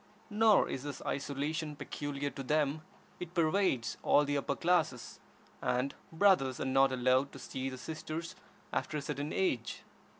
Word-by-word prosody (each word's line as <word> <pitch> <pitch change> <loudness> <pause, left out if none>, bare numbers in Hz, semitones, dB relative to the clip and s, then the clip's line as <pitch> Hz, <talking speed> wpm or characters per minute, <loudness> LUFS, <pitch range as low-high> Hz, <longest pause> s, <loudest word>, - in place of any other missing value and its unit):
Nor 215 0 +5
is 130 - -4
this 145 -1 -6
isolation 145 +2 -2
peculiar 145 -1 -4
to - - -7
them; 150 +2 +1 0.4
it 180 0 -7
pervades 160 - +2
all 145 - +4
the 145 0 -1
upper 140 0 0
classes, 165 -8 0 0.4
and 125 +3 0 0.2
brothers 160 -8 +3
are - - -2
not 135 0 +4
allowed 130 +2 +2
to - - -8
see 130 0 -4
their 130 - -7
sisters 160 +3 -5 0.4
after 155 - -1
a - - -2
certain 145 +1 -3
age. 130 -12 -1
145 Hz, 155 wpm, -33 LUFS, 135-160 Hz, 0.4 s, Nor